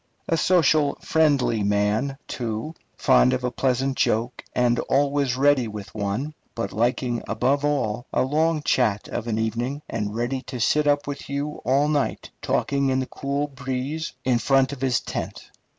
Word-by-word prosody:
A 165 - +2
social, 155 -4 +3
friendly 145 -8 +2
man, 105 +7 +1
too, 115 +5 -4 0.2
fond 130 -2 +4
of 130 0 -1
a 125 - 0
pleasant 135 +1 0
joke 115 +3 0
and 120 -1 +2
also 140 -2 +1
ready 140 -3 +4
with 105 -2 -8
one; 110 +8 -2 0.2
but 115 -4 -3
liking 120 +2 0
above 140 +3 +1
all 125 -5 -1
a - - +2
long 155 +3 +1
chat 110 -8 +1
of 120 - -4
an 110 -2 -1
evening, 120 +6 -2
and 105 -1 -3
ready 120 +3 -1
to 125 - -5
sit 150 +6 +2
up 145 0 +2
with 140 0 -6
you 145 +2 -3
all 135 +4 +3
night, 150 -2 -1
talking 140 -1 0
in 130 0 +1
the 130 - -1
cool 140 +2 -2
breeze 135 +3 -4
in 125 -2 +3
front 135 +1 +3
of 135 - -9
his 130 -4 +2
tent. - - -6
130 Hz, 165 wpm, -24 LUFS, 120-145 Hz, 0.2 s, fond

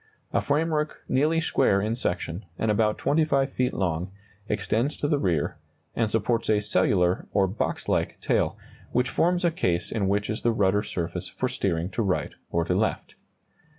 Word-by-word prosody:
A - - +3
framework 150 +1 0
nearly 155 +5 +2
square 100 -10 +2
in 110 +3 -1
section, 90 -4 -2
and 110 - +1
about 105 0 +2
25 140 -3 +2
feet 125 0 0
long, 90 0 -2 0.4
extends 120 +7 0
to 145 - -1
the 145 -1 +2
rear, 85 - 0 0.4
and 115 -2 +1
supports 115 +2 0
a 105 -1 +4
cellular, 95 -3 +2
or 100 -1 +4
box 95 +4 -3
like, - - 0
tail, - - +1 0.3
which 125 0 +1
forms 175 +1 +2
a 170 - +3
case 85 - 0
in 105 -4 0
which 100 +1 +1
is 110 - -3
the 120 - +2
rudder 105 -1 +2
surface 90 -5 -4
for - - -2
steering 85 +3 -1
to 115 - -1
right 95 -4 0 0.2
or 85 0 0
to 90 - 0
left. 110 +4 -1
110 Hz, 175 wpm, -26 LUFS, 95-135 Hz, 0.4 s, a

